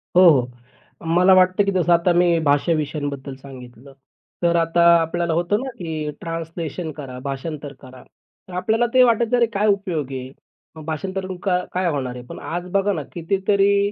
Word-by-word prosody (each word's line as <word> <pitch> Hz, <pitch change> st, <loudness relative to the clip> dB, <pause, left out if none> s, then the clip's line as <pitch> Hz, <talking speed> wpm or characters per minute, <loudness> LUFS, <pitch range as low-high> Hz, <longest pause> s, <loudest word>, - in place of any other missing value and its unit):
हो, 180 Hz, -1 st, +8 dB
हो. 125 Hz, -5 st, +3 dB, 0.7 s
मला 185 Hz, +1 st, +6 dB
वाटतं, 185 Hz, +2 st, +4 dB
की 200 Hz, -, +1 dB
जसं 175 Hz, -2 st, +2 dB
आता 170 Hz, +1 st, +3 dB
मी 175 Hz, -1 st, +3 dB
भाषा 145 Hz, +4 st, +2 dB
विषयांबद्दल 145 Hz, -3 st, -4 dB
सांगितलं. 130 Hz, -1 st, -13 dB, 0.5 s
तर 170 Hz, 0 st, +3 dB
आता 165 Hz, +1 st, +1 dB, 0.2 s
आपल्याला 170 Hz, 0 st, -1 dB
होतं 175 Hz, +6 st, +1 dB
ना, 270 Hz, -, -4 dB
की 155 Hz, -4 st, -4 dB
ट्रान्सलेशन 165 Hz, 0 st, -5 dB
करा, 130 Hz, -4 st, -8 dB
भाषांतर 140 Hz, +1 st, -5 dB
करा. 130 Hz, -1 st, -13 dB, 0.4 s
तर 185 Hz, -, -12 dB
आपल्याला 225 Hz, +5 st, +1 dB
ते 255 Hz, 0 st, +7 dB
वाटायचं, 235 Hz, 0 st, +2 dB
अरे, 235 Hz, -, +4 dB
काय 210 Hz, +2 st, +1 dB
उपयोग 175 Hz, -9 st, -1 dB
आहे? 130 Hz, 0 st, -6 dB, 0.5 s
भाषांतर 190 Hz, +5 st, -3 dB
करून 185 Hz, -1 st, -6 dB, 0.4 s
काय 185 Hz, -1 st, 0 dB
होणार 130 Hz, -4 st, -3 dB
आहे? 125 Hz, -, -8 dB
पण -, -, -9 dB
आज 175 Hz, +2 st, -5 dB
बघा 200 Hz, +1 st, +1 dB
ना, 155 Hz, -, -4 dB
कितीतरी 200 Hz, +3 st, +1 dB
170 Hz, 170 wpm, -21 LUFS, 145-190 Hz, 0.7 s, हो